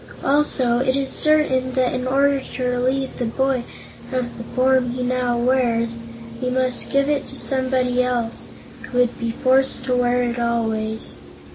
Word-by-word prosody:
Also 270 -4 +2
it 260 0 +1
is 275 -1 -1
certain 265 -4 +2
that 255 -1 +1
in 255 0 -2
order 275 +1 +2
to 255 - -6
relieve 255 +2 -1
the 245 - -1
boy 260 +2 0 0.5
of 250 -2 -3
the 235 - -7
form 260 -1 +3
he 250 +1 -3
now 250 -1 0
wears, 235 -2 +1 0.4
we 250 - -1
must 255 0 +1
give 275 0 +2
it 290 -2 -1
to - - -4
someone 260 -2 +1
else, 245 -2 -1 0.3
who 250 - -6
would 245 -1 +1
be 235 - -2
forced 260 +2 +2
to 255 -1 0
wear 245 0 +2
it 240 0 -2
always." 225 -2 -2
255 Hz, 165 wpm, -21 LUFS, 240-265 Hz, 0.5 s, form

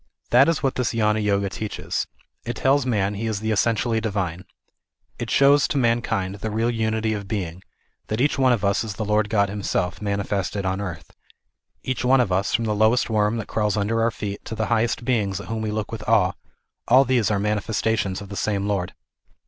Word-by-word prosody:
That 130 +5 +6
is 165 -3 0
what 135 - +2
this 125 -2 -1
Gnana 105 -1 +2
Yoga 100 -1 +1
teaches. 100 +2 -4 0.4
It 120 - -4
tells 135 0 +2
man 105 -4 +1
he 110 +3 -3
is 110 -3 -2
the 110 +1 -2
essentially 115 +1 +1
divine. 95 -5 -3 0.7
It 120 - -4
shows 140 +2 +5
to - - -2
mankind 115 -6 0
the 105 +2 -5
real 115 +3 0
unity 110 -1 0
of 100 -2 -5
being; 90 -4 -4 0.5
that 110 - -2
each 145 +3 +2
one 130 -1 +4
of 115 -4 +1
us 100 +2 +2
is 110 -3 -5
the 110 - -3
Lord 105 0 +1
God 100 -2 +2
himself, 95 -3 -2
manifested 100 -1 -2
on 95 +1 -1
earth. 85 -6 -6 0.7
Each 130 -1 -2
one 130 +1 +4
of 120 -6 +1
us, 95 +3 +1
from 115 - 0
the 105 - 0
lowest 110 +3 +2
worm 105 +1 +2
that 110 - -4
crawls 105 -2 0
under 110 +3 0
our 115 - +3
feet 100 -3 -6
to 110 - -5
the 110 0 -1
highest 115 +1 0
beings 105 -7 0
at 100 - -9
whom 115 -1 -2
we 110 - -2
look 105 -1 -3
with 115 -2 -5
awe, 105 -5 +4 0.6
all 130 +3 +6
these 120 -5 +2
are 105 - +1
manifestations 105 -1 -1
of 100 - -9
the 100 - -6
same 100 -1 -1
Lord. 95 -4 -2
110 Hz, 210 wpm, -23 LUFS, 100-115 Hz, 0.7 s, That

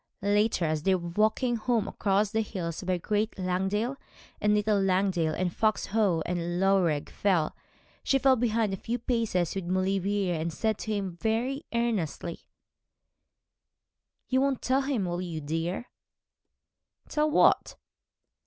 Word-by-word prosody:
Later, 205 -2 +2
as 155 -1 0
they 190 +4 +3
were 175 -1 -4
walking 220 +6 +1
home 230 -1 0
across 200 +1 +1
the 220 0 +1
hills, 175 -6 -4
by 185 -1 0
Great 210 +4 -1
Langdale 190 +7 -1 0.4
and 210 0 +3
Little 210 -1 +2
Langdale, 185 -4 +1
and 180 -2 -1
Fox 215 -1 +1
Howe 200 -6 +1
and 175 0 -2
Loughrigg 185 -6 +2
Fell, 180 -6 +1 0.5
she 270 - +3
fell 270 -1 +4
behind 225 -3 +1
a - - -2
few 235 +5 -3
paces 225 -8 0
with 195 -2 -4
Maulevrier, 190 +1 0
and 165 +1 -2
said 220 +5 -1
to 220 - -4
him 195 -4 -3
very 240 - -1
earnestly 205 -8 -2 1.8
'You 260 0 +2
won't 275 -2 0
tell, 260 +2 +2
will 185 -9 -1
you, 170 -3 -4
dear?' 165 +8 -3 1.2
'Tell 305 0 +1
what?' 300 - +3
195 Hz, 140 wpm, -28 LUFS, 175-225 Hz, 1.8 s, fell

